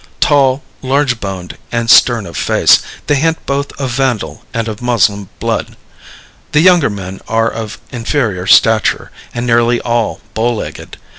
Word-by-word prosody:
Tall, 140 -1 +3 0.2
large 130 -2 0
boned, 95 -3 -6
and 115 -1 -1
stern 115 -2 +5
of 85 -2 -10
face, - - +3 0.2
they - - +1
hint 165 +3 0
both 140 +1 -2
of 135 -3 -2
Vandal 130 -3 -2
and 115 -2 -2
of 110 0 -6
Moslem 105 -5 +1
blood. - - -3 0.8
The 150 - +4
younger 175 -5 +5
men 95 -2 -7
are 115 0 +1
of 110 -1 -6
inferior 115 -7 -2
stature, 110 +2 +3 0.2
and 120 +1 -4
nearly 120 0 +2
all 115 -2 -1
bow 115 +2 0
legged. - - -7
120 Hz, 150 wpm, -14 LUFS, 110-135 Hz, 0.8 s, stern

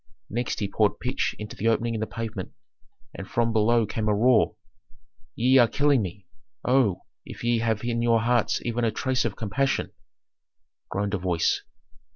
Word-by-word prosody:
Next 120 +3 -2
he 105 - -1
poured 105 +1 +1
pitch 125 - -1
into 105 -1 -7
the 115 - -2
opening 115 +1 +1
in 110 - -2
the 110 - -2
pavement, 110 -5 -6 0.6
and 100 - -8
from 120 -2 +1
below 115 +1 +3
came 110 +1 -2
a 105 - +3
roar, 115 0 +3 0.8
"Ye 130 +3 +4
are 120 - +6
killing 145 0 +2
me. 95 0 -6 0.4
Oh, 125 -8 +2 0.2
if - - -10
ye 120 -1 +2
have 110 -1 -1
in 120 -1 -1
your 115 -1 +3
hearts 120 0 +1
even 120 0 -1
a 115 - +3
trace 130 +4 -1
of - - -2
compassion," 130 +6 -1 1.0
groaned 100 +1 -2
a 105 - 0
voice. 85 -2 +1
115 Hz, 175 wpm, -25 LUFS, 105-120 Hz, 1.0 s, are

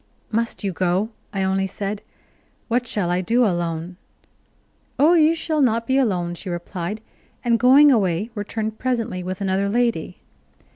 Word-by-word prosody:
"Must 230 0 -1
you 195 - 0
go?" 185 +4 0 0.2
I 195 -1 -1
only 190 0 0
said. 200 +2 -4 0.7
"What 245 +1 0
shall 190 -6 -1
I 180 +1 +1
do 235 +7 +2
alone?". 175 -2 -2 1.0
"Oh, 300 +5 +5
you 325 -1 +4
shall 315 -2 -1
not 230 -3 +2
be 260 - 0
alone," 185 -10 +1
she 180 +2 -7
replied, 175 +3 -5 0.4
and 235 -1 +2
going 275 +4 +7
away 200 -2 +1
returned 220 +1 -4
presently 235 -7 -2
with 185 +2 -5
another 195 +1 0
lady. 230 -6 0
210 Hz, 150 wpm, -22 LUFS, 185-240 Hz, 1.0 s, going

